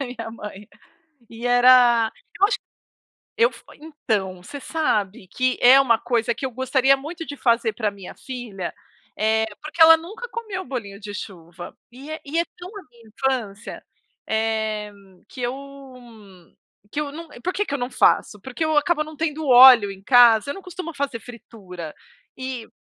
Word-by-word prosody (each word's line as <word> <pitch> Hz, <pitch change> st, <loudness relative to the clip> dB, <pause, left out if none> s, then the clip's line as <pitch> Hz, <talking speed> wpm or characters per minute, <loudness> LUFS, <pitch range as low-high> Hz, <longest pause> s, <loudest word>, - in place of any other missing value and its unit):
minha 245 Hz, -4 st, -6 dB
mãe. 210 Hz, -2 st, -10 dB, 0.6 s
E 230 Hz, +1 st, -9 dB
era 245 Hz, -2 st, +5 dB, 0.3 s
eu 400 Hz, -, +6 dB
acho -, -, -1 dB, 0.8 s
eu 465 Hz, +2 st, +4 dB
f -, -, -16 dB, 0.2 s
então, 215 Hz, -, -3 dB
você 280 Hz, +10 st, -9 dB
sabe 210 Hz, -13 st, -2 dB
que 255 Hz, +7 st, -1 dB
é 260 Hz, +3 st, +8 dB
uma 235 Hz, -4 st, +3 dB
coisa 235 Hz, 0 st, 0 dB
que 265 Hz, -, -4 dB
eu -, -, -5 dB
gostaria 260 Hz, +2 st, +2 dB
muito 325 Hz, +4 st, -8 dB
de 285 Hz, -, -7 dB
fazer 235 Hz, -3 st, +1 dB
para 215 Hz, 0 st, -2 dB
a -, -, -2 dB
minha 195 Hz, -2 st, -11 dB
filha. 235 Hz, -8 st, -7 dB, 0.5 s
Eh, 220 Hz, +1 st, +1 dB, 0.2 s
porque 305 Hz, +2 st, -8 dB
ela, 325 Hz, 0 st, +9 dB
nunca 395 Hz, +9 st, -9 dB
comeu 435 Hz, -5 st, -6 dB
bolinho 210 Hz, -7 st, -7 dB
de 205 Hz, -1 st, -8 dB
chuva. 175 Hz, -4 st, -9 dB
E 270 Hz, +5 st, -12 dB
é 315 Hz, -, -6 dB
e 305 Hz, +4 st, -3 dB
é 340 Hz, -, +2 dB
tão 355 Hz, 0 st, -10 dB
a 405 Hz, -, -8 dB
minha 235 Hz, -2 st, -20 dB
infância, 230 Hz, -3 st, -4 dB, 0.4 s
eh, 220 Hz, -1 st, -1 dB, 0.4 s
que -, -, -11 dB
eu 245 Hz, +1 st, -1 dB, 1.4 s
que 295 Hz, -, -2 dB
eu 295 Hz, -1 st, -4 dB
n 305 Hz, -3 st, -11 dB
por 365 Hz, -, -2 dB
que 415 Hz, -, 0 dB
que -, -, -7 dB
eu -, -, -2 dB
não 245 Hz, 0 st, -4 dB
faço? 210 Hz, -, +2 dB
Porque 260 Hz, +8 st, -4 dB
eu 315 Hz, -1 st, 0 dB
acabo 305 Hz, +1 st, +2 dB
não 310 Hz, 0 st, -11 dB
tendo 315 Hz, -1 st, -3 dB
óleo 245 Hz, -4 st, +8 dB
em 195 Hz, 0 st, -11 dB
casa. 240 Hz, +1 st, +5 dB
Eu -, -, -3 dB
não 390 Hz, -, -10 dB
costumo 360 Hz, -2 st, -8 dB
fazer 280 Hz, -4 st, -3 dB
fritura. 200 Hz, -9 st, -11 dB, 0.4 s
E 260 Hz, -3 st, -6 dB
245 Hz, 175 wpm, -22 LUFS, 220-295 Hz, 1.4 s, ela